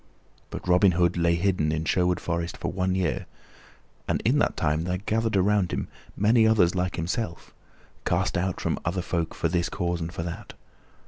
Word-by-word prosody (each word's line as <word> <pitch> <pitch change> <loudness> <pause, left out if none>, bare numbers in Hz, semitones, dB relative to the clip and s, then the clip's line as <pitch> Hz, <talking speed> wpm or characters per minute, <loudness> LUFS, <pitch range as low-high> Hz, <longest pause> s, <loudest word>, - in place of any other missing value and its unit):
But - - -7
Robin 90 +1 +5
Hood 85 0 +2
lay 85 -1 +2
hidden 85 -4 +1
in 80 +1 -2
Sherwood 90 +1 +2
Forest 85 0 -3
for - - -3
one 95 0 0
year, 90 -4 -1 0.8
and - - +1
in - - +3
that - - +1
time 75 +1 +1
there 90 0 -1
gathered 110 +2 0
around 100 -1 +2
him - - -3 0.3
many 110 +2 +4
others 100 -6 +4
like 90 -1 -1
himself, 85 +2 -4 0.5
cast 90 +2 0
out 95 0 -1
from - - -1
other 90 +2 -1
folk 85 -2 -2
for - - 0
this 85 +1 0
cause 85 -2 -2
and 80 +1 -3
for 85 - -4
that. 85 0 -7
90 Hz, 185 wpm, -26 LUFS, 85-95 Hz, 0.8 s, Robin